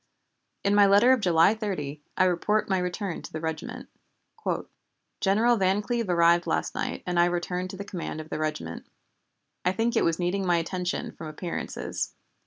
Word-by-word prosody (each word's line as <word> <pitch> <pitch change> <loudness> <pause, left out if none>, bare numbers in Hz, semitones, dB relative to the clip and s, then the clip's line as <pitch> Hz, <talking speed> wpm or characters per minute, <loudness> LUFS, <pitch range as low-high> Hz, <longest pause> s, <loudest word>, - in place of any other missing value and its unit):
In 200 - +2
my 205 -1 +6
letter 205 +6 +6
of 260 - +2
July 175 0 +5
30, 155 -10 -4 0.2
I - - +5
report 185 +4 +1
my 190 -2 +1
return 180 0 -3
to - - -10
the 155 - -4
regiment: 160 -1 -5 1.3
"General 225 +5 +3
Van 195 +1 +2
Cleve 235 -3 -1
arrived 170 0 +4
last - - 0
night - - -3
and 175 -1 0
I 175 - +6
returned 180 +1 -2
to 190 - -7
the 200 - -6
command 175 -5 -5
of 155 0 -8
the - - -2
regiment. 85 - -4 0.8
I 180 - +2
think 230 +3 0
it - - +3
was 165 -1 +2
needing 180 +2 0
my 175 -2 +3
attention 180 +2 -2
from 160 - -9
appearances. 170 +3 -4
180 Hz, 180 wpm, -27 LUFS, 170-200 Hz, 1.3 s, my